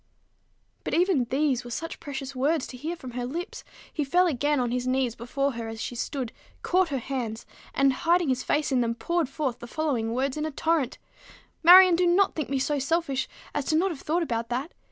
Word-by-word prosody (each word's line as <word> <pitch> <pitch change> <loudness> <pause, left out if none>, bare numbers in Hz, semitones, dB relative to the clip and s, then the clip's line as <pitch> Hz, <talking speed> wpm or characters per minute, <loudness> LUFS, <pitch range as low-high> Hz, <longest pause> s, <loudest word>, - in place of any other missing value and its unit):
But - - -2
even 340 -7 +3
these 265 0 0
were 240 - -9
such 330 +7 -5
precious 275 -3 -6
words 285 +3 +1
to - - -9
hear 315 +7 -4
from 260 -7 -9
her 245 +1 -4
lips! 345 - -5 0.3
He 300 - -1
fell 355 +6 +3
again 295 -2 +1
on 245 -2 0
his 250 0 -1
knees 255 -2 +1
before 275 +4 -2
her 230 -2 -5
as 225 0 -7
she 245 - -4
stood, 250 0 -3 0.3
caught 365 -1 +2
her 275 - -1
hands, 240 -3 -4 0.3
and, 275 -1 +4
hiding 340 +2 +2
his 255 -1 +1
face 295 -1 0
in 255 -2 +3
them, 230 -1 0
poured 330 +5 -1
forth 275 -4 -3
the 240 - -9
following 255 -6 -1
words 265 +2 -1
in 305 - -1
a - - -2
torrent, 310 -3 0 0.6
"Marion, 360 +1 +9
do 355 +1 +2
not 370 +3 +3
think 310 -5 -3
me 275 - 0
so 285 +2 0
selfish 280 -1 0 0.3
as 290 0 -1
not 350 +5 +3
to - - -3
have 275 - -11
thought 335 +3 0
about 230 -5 -2
that. 260 +7 -3
275 Hz, 215 wpm, -26 LUFS, 250-330 Hz, 0.6 s, Marion